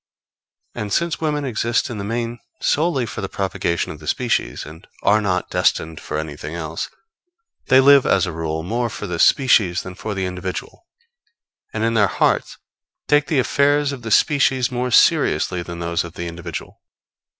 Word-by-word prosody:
] - - -53
And 105 -1 -5
since 170 +4 0
women 150 -2 -1
exist 120 -1 0
in 110 - -5
the - - -4
main 115 +2 -3 0.2
solely 150 -5 +1
for 110 - -6
the 95 - -4
propagation 95 -3 -2
of 75 - -9
the 75 - -12
species, 120 +5 -1
and 80 +2 -12 0.2
are 105 +1 +4
not 95 -3 -1
destined 80 -1 0
for - - -5
anything 75 +1 -5
else, 80 -1 -4 0.8
they 130 - +6
live, 140 0 +6
as 95 -2 +3
a 90 - -4
rule, 80 -1 -3
more 120 +6 -1
for 105 - -6
the 90 -4 -4
species 105 -10 +4
than 95 - -8
for 105 +2 -5
the 95 -1 -1
individual, 90 - -6 0.8
and 110 - -3
in 115 0 +1
their 105 -3 +4
hearts - - 0 0.5
take 150 -1 +3
the 150 - 0
affairs 145 +2 +2
of 135 -3 -7
the 115 - -6
species 135 +1 +3
more 125 0 -1
seriously 90 -5 +3
than 85 0 -7
those 85 0 -1
of 85 -1 -9
the 85 - -5
individual. 85 -1 -7
105 Hz, 180 wpm, -21 LUFS, 85-130 Hz, 0.8 s, they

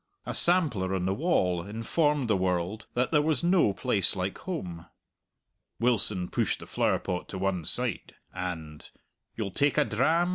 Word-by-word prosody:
A - - -4
sampler 130 - +2
on 90 -1 -1
the 95 - +1
wall 95 - +1
informed 125 - 0
the 110 - +2
world 90 +3 -1
that 125 +1 +1
there 150 -2 +4
was 155 -1 0
no 175 - +4
place 95 -1 +2
like 95 +1 -2
home. 90 - -6 0.9
Wilson 105 -6 +1
pushed - - -1
the - - -9
flowerpot 90 -1 -1
to 95 - -5
one 95 -3 -1
side, - - 0 0.2
and 80 -5 -6 0.5
"You'll 105 -4 -3
take 145 +8 +2
a 150 - +4
dram?" 160 +11 +2
105 Hz, 155 wpm, -28 LUFS, 90-150 Hz, 0.9 s, there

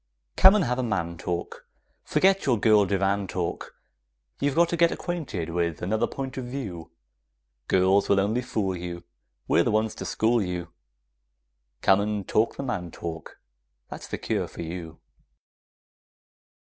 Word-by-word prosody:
Come 190 +2 +8
and 210 - +3
have 125 0 -1
a - - 0
man 85 -7 -2
talk, 85 +1 -5 0.4
Forget 195 -2 +2
your 120 -5 +3
girl 105 -2 +5
divan 100 0 0
talk; 90 -1 -4 0.6
You've 140 0 0
got 170 +1 +5
to - - 0
get 170 0 +4
acquainted 140 - -4
with 85 -2 -1
another 110 +5 +1
point 135 -1 -6
of 130 - -3
view! 105 -11 -6 0.8
Girls 95 +2 +3
will 100 - +4
only 105 +5 +1
fool 105 -6 -2
you; 85 0 -6 0.4
We're - - +4
the - - 0
ones 110 0 +1
to - - -7
school 115 +1 +2
you; 90 -2 -3 1.1
Come 95 0 +5
and 105 -2 -2
talk 110 +2 +2
the - - -5
man 95 -10 -3
talk; 80 0 -7 0.5
that's - - -8
the - - -4
cure - - -2
for - - -8
you! 85 -1 -7
100 Hz, 155 wpm, -26 LUFS, 90-125 Hz, 1.1 s, Come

